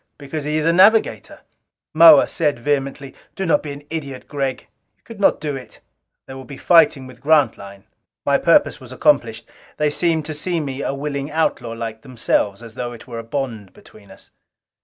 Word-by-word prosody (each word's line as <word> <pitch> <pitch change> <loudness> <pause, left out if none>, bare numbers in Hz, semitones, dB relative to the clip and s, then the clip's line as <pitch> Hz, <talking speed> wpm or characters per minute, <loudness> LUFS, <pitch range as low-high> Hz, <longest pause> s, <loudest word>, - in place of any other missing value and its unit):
Because 145 +1 -6
he 150 +1 -1
is 155 - -1
a 165 - +3
navigator!" 205 +5 +3 0.5
Moa 160 -2 +8
said 150 -5 -1
vehemently, 140 +1 -3 0.2
"Do 195 - -3
not 160 -4 +2
be 150 - -7
an 140 +1 -9
idiot, 140 -5 -6
Gregg! 135 -3 -3 0.4
You - - -43
could 230 -3 -12
not 200 - +3
do 145 -2 -4
it! 130 - -11 0.5
There 130 - -10
will 135 - -9
be 140 +1 -11
fighting 160 -6 +4
with 130 -1 -14
Grantline!" 115 -10 +1 0.4
My - - +2
purpose - - +3
was - - -12
accomplished. - - +1 0.3
They 150 -1 +1
seemed 160 -1 0
to 155 - -5
see 170 +3 -2
me 140 -3 -5
a - - -2
willing 140 0 -4
outlaw 150 -7 -1
like 115 -1 -6
themselves. 115 -4 -1
As 115 -1 -11
though 120 0 -5
it 115 - -12
were 120 -2 -7
a - - -7
bond 115 -5 -5
between 100 -2 -18
us. 95 - -17
140 Hz, 190 wpm, -20 LUFS, 120-155 Hz, 0.5 s, Moa